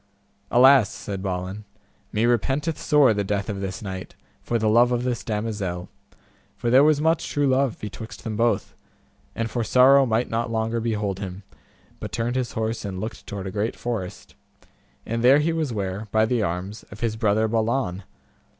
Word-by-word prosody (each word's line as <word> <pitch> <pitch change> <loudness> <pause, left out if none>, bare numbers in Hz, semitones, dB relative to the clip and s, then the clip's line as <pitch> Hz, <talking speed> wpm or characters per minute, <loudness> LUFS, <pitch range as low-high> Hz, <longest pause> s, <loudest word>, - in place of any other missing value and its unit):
Alas, 130 -2 +6
said 100 0 -6
Balin, 95 +2 -4 0.5
me 110 +2 +1
repenteth 135 - 0
sore 145 -6 +4
the 100 -1 -1
death 100 +1 -2
of 100 - -5
this 95 +2 -5
knight, 95 -2 -6 0.3
for 120 - -1
the 110 -1 0
love 120 +3 +5
of 120 0 0
this 125 -2 -2
damosel, 105 -5 -3 0.7
for 120 - -1
there 130 +3 +7
was 150 -1 +4
much 160 +1 +1
true 145 -1 +1
love 135 -2 +2
betwixt 105 +2 -8
them 110 -1 -4
both, 115 +2 0 0.6
and 115 0 -2
for 120 - -1
sorrow 130 +4 +5
might 115 +2 +1
not 115 +1 -2
longer 115 +1 -1
behold 105 -4 -2
him, 95 0 -6 0.6
but - - -6
turned 120 +2 -2
his 125 -2 -2
horse 110 +1 -2
and 95 -3 -5
looked 110 +4 -6
toward 100 -1 -5
a 95 - -4
great 105 +3 -2
forest, 110 -7 -5 0.7
and 115 +1 -2
there 130 +3 +7
he 155 +3 +1
was 160 -5 -1
ware, 100 0 -3
by 110 0 +3
the 120 0 0
arms, 95 +3 -3
of 100 - -12
his 115 -2 0
brother 110 -1 +2
Balan. 110 -4 0
110 Hz, 180 wpm, -24 LUFS, 100-125 Hz, 0.7 s, there